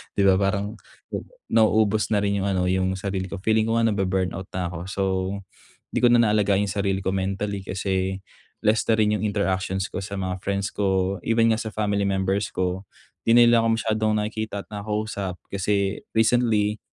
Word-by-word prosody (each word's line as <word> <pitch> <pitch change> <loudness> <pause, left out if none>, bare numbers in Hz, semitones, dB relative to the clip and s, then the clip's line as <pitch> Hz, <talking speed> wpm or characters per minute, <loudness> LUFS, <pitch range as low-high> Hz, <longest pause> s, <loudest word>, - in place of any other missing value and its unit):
'di 100 - +2
ba 95 - +6
parang 100 +2 -1 0.4
'baga - - -5 0.2
nauubos 110 -1 +3
na 105 - +3
rin 100 0 0
yung - - 0
ano, 95 -2 +1
yung 95 0 +1
sarili 95 -1 -3
ko. 100 - -5
Feeling 110 +2 +2
ko 115 - +1
nga 115 - +3
nabu-burnout 95 -2 -1
na 90 -1 -2
ako. 85 -1 -6
So, 100 - -1 0.9
'di - - -1
ko 125 - +4
na 120 -1 +5
naalagaan 105 -2 +2
yung 100 - -1
sarili 100 -1 -1
ko, 95 - 0
mentally 95 +1 -2
kasi 95 0 -2 0.4
less 110 +1 +2
na 115 - +4
rin 105 -1 +2
yung - - -3
interactions 95 -2 -1
ko - - -5
sa 100 +1 -5
mga 95 -1 -3
friends 100 +1 -2
ko. 95 -1 0
Even 115 0 +3
nga 110 - +2
sa 110 -2 -5
family 100 -2 0
members 95 +1 -1
ko, 95 +1 -2 0.4
'di 115 - +5
na 120 - +8
nila 120 0 +6
ako 115 0 +3
masyadong 110 -1 0
nakikita 110 -1 -4
at - - -29
nakakausap. 105 -2 -3 0.2
Kasi 100 0 0 0.2
recently, 110 -2 +2
100 Hz, 190 wpm, -24 LUFS, 95-110 Hz, 0.9 s, na